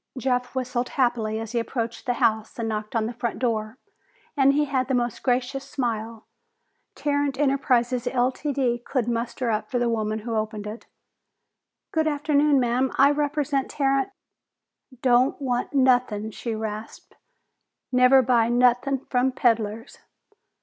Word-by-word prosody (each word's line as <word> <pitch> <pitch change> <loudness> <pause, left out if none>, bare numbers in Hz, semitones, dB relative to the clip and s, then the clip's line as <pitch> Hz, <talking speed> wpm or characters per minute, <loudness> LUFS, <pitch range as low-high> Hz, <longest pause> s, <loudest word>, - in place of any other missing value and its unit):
Jeff 250 0 -1
whistled 250 -1 -2
happily 230 -4 0
as 225 -1 -6
he 240 - 0
approached 230 0 -4
the 245 - +1
house 220 -2 0
and 230 -1 -2
knocked 215 0 -4
on 225 -1 +1
the 235 - -4
front 235 0 -3
door, 225 -2 -2 0.6
and 275 -1 +4
he 295 +1 +2
had 260 -3 -1
the 265 - +1
most 240 -2 -1
gracious 255 +2 0
smile 230 -5 -4 0.7
Tarrant 285 -2 -1
Enterprises, 255 -3 +1
Ltd., 255 0 0
could 250 -4 -1
muster 235 +1 -2
up 215 0 -2
for 250 - -1
the 240 0 +1
woman 215 -1 -1
who 225 +1 -4
opened 215 -1 -3
it. 215 +3 -8 1.0
"Good 315 -1 +1
afternoon, 295 -1 +2
ma'am. 250 +1 +1
I 280 +1 +6
represent 290 -1 -1
Tarrant 275 -1 +1 0.5
" 255 -3 -26
"Don't 255 +1 +3
want 250 -3 -2
nothin'!" 250 -6 +2
she 230 +1 -4
rasped. 215 0 -7 0.8
"Never 255 +1 +6
buy 235 -2 +3
nothin' 250 +2 +2
from 255 +1 +1
peddlers!" 230 -3 -1
245 Hz, 145 wpm, -24 LUFS, 230-270 Hz, 1.0 s, I